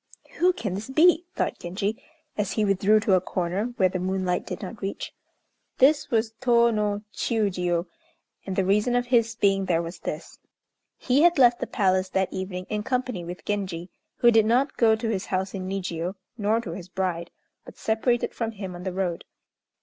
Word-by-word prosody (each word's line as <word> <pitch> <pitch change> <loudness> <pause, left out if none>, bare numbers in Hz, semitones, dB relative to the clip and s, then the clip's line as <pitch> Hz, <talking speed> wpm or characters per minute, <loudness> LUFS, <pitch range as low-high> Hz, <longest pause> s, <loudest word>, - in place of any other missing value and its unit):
"Who 360 +1 +4
can 205 - -4
this 205 +6 -5
be?" 335 +4 +4
thought - - -1
Genji, 200 +7 -3 0.3
as 210 -2 -1
he 215 - +1
withdrew 200 +2 +4
to 205 - +2
a 185 - +4
corner 185 +3 -2
where 190 - +4
the 185 0 -3
moonlight 185 -1 -1
did - - -5
not 205 +1 -8
reach. 195 0 -4 0.6
This 295 +3 +4
was 225 -1 0
Tô 235 -2 +4
no 210 -1 -1
Chiûjiô, 180 -6 0 0.6
and 190 - -3
the 190 - +1
reason 210 +5 +2
of 245 0 +1
his 230 -2 +2
being 195 -3 +2
there 170 -2 +1
was 170 +2 -7
this: 155 +2 -6 0.6
He 260 +3 +2
had 345 0 +5
left 245 -2 +5
the 255 - -3
Palace 190 -4 +1
that 190 0 0
evening 185 -1 -4
in 210 0 -2
company 250 -5 -2
with 175 +2 -8
Genji, 190 -4 -3 0.2
who 240 - +5
did 220 -2 +4
not 255 +5 +2
go 225 -2 +4
to 225 +1 -4
his 200 -3 -2
house 190 0 -2
in 185 -1 -4
Nijiô, 180 -1 -3 0.2
nor 215 0 +1
to 180 - -6
his 175 +1 -8
bride, 180 -2 -2 0.3
but - - -13
separated 230 +2 0
from 225 -1 -3
him 195 -3 -6
on 175 - -8
the 185 0 -4
road. 180 -3 -2
200 Hz, 190 wpm, -25 LUFS, 185-230 Hz, 0.6 s, had